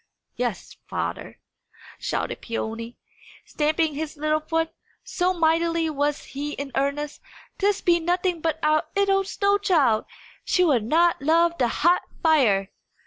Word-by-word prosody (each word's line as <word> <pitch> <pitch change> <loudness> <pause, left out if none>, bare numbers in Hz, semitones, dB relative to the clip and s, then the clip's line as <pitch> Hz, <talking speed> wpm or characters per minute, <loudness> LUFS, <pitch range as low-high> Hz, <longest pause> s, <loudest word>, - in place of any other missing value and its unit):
"Yes, - - -4
father," - - -4 0.6
shouted - - -3
Peony, 230 0 -5 0.5
stamping 310 +1 0
his 305 +1 -5
little 305 +1 +1
foot, 325 +1 -1 0.3
so 365 0 0
mightily 330 -1 +1
was 290 0 -1
he 290 +2 -5
in 280 -1 -6
earnest, 280 +2 -2 0.4
"this 405 0 +1
be 345 -1 +3
nothing 355 0 0
but 320 -1 0
our 305 0 +2
'ittle 395 -1 +3
snow 400 +1 +1
child! 290 - +2 0.4
She 365 - +2
will 290 -8 +4
not 325 +8 +2
love 335 +3 +3
the 245 - +3
hot 345 +9 +2 0.2
fire!" 230 - +3
315 Hz, 135 wpm, -24 LUFS, 285-345 Hz, 0.6 s, will